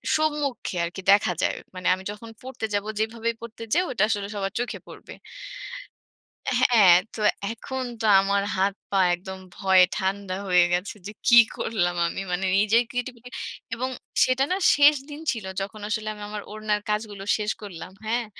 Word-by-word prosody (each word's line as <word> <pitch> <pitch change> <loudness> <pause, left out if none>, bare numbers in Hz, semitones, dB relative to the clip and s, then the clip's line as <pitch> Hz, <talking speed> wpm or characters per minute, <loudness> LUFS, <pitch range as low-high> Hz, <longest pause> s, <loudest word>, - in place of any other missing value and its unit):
সম্মুখে 295 -8 -1
আরকি, 175 +3 -4
দেখা 200 -2 +4
যায়। - - +1 0.2
মানে 185 -1 -3
আমি 190 +1 -5
যখন 220 +2 -10
পড়তে 260 -3 -5
যাব, 205 - +1 0.2
যেভাবেই 230 +1 -1
পড়তে 230 0 -8
যাই 355 - +4
ওটা 225 -5 +1
আসলে 205 -2 -1
সবার 195 -1 -3
চোখে 245 - -3
পড়বে। - - -11 1.5
হ্যাঁ, 255 - +5
অ্যাঁ 190 -6 +8 0.2
তো 220 - -5 0.3
এখন 260 +3 -5 0.2
তো - - -1 0.2
আমার 200 +1 +1
হাত 195 +1 +2 0.2
পা 195 - +2
একদম 190 +2 -6 0.2
ভয়ে 190 -1 +6
ঠান্ডা 195 -1 -2
হয়ে 180 -1 +5
গেছে, 180 +4 -1
যে - - -6 0.2
কি 235 - +8 0.2
করলাম 175 -5 0
আমি? 180 - -4
মানে 185 +2 -1
নিজের 215 +4 +4
ক্রিয়েটিভিটি 245 0 -5 0.5
এবং 255 +3 -2 0.4
সেটা 255 +1 +2
না, - - +3 0.2
শেষ 290 +1 +7
দিন 295 +1 -8
ছিল, 225 -6 -5 0.2
যখন 205 +2 -6
আসলে 215 0 -2
আমি 210 -1 -9
আমার 210 0 -5
ওড়নার 215 -1 -1
কাজগুলো 210 -2 -2
শেষ 210 0 -1
করলাম। 185 -3 -8
হ্যাঁ? 235 +2 0
210 Hz, 170 wpm, -25 LUFS, 195-235 Hz, 1.5 s, অ্যাঁ